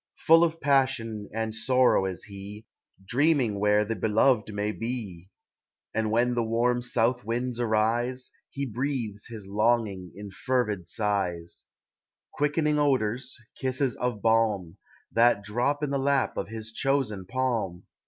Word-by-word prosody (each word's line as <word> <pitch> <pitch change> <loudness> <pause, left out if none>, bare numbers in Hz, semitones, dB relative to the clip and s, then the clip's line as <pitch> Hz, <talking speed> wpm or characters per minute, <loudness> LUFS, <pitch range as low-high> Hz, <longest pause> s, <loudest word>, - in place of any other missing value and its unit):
Full 165 +1 +6
of 165 -1 0
passion 130 -7 +1
and 110 0 -2
sorrow 125 -2 +3
is 95 -2 -5
he, 100 +2 -10 0.4
Dreaming 130 -3 +2
where 105 +1 +3
the 115 +2 -2
beloved 110 +2 +2
may 105 0 -1
be; 105 -7 -5 0.6
And 110 0 0
when 120 +3 +2
the 120 - +1
warm 120 +2 +1
south 125 +1 +1
winds 120 +2 -2
arise, 120 +3 0 0.2
He 140 0 -4
breathes 120 -4 -3
his 110 -4 -8
longing 105 -3 0
in 100 0 -8
fervid 105 -5 -1
sighs, 90 -4 -2 0.7
Quickening 150 0 +1
odors, 130 -3 0 0.2
kisses 130 -1 -1
of 120 -5 -2
balm, 110 -6 +1 0.3
That 115 -3 +4
drop 125 +8 0
in 145 - -1
the 140 - 0
lap 140 0 +1
of - - -3
his 110 +1 -6
chosen 110 -7 -1
palm. 115 -8 -1
115 Hz, 135 wpm, -27 LUFS, 105-130 Hz, 0.7 s, Full